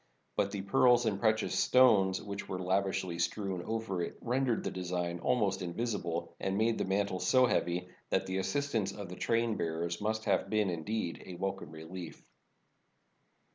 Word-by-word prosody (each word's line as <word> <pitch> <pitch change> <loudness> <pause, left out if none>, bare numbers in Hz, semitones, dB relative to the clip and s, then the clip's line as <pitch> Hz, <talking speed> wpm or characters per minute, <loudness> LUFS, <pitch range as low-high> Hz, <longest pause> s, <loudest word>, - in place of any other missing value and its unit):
But 100 - +1
the 100 -1 -4
pearls 120 +2 +4
and 100 -3 0
precious 110 0 +2
stones 100 -7 +4
which 100 -1 -6
were 95 - -2
lavishly 95 -1 0
strewn 95 +1 -1
over 110 -3 -2
it 85 - -4
rendered 125 -1 0
the - - -2
design 90 -1 -2
almost 105 -2 +1
invisible 85 -3 -3
and 95 0 -1
made 115 +1 +2
the - - 0
man 100 +2 +1
tle 95 -2 -4
so 130 +5 +4
heavy 90 -5 0 0.2
that - - +1
the 95 0 -2
assistance 105 0 0
of 100 -3 -7
the 90 - -7
train 115 +1 +1
bearers 85 +2 -2
must 110 +1 -1
have - - +1
been, 105 -3 +2
indeed, 85 +2 -3
a 90 - -7
welcome 95 -3 -3
relief. 80 +3 -9
95 Hz, 170 wpm, -32 LUFS, 90-110 Hz, 0.2 s, pearls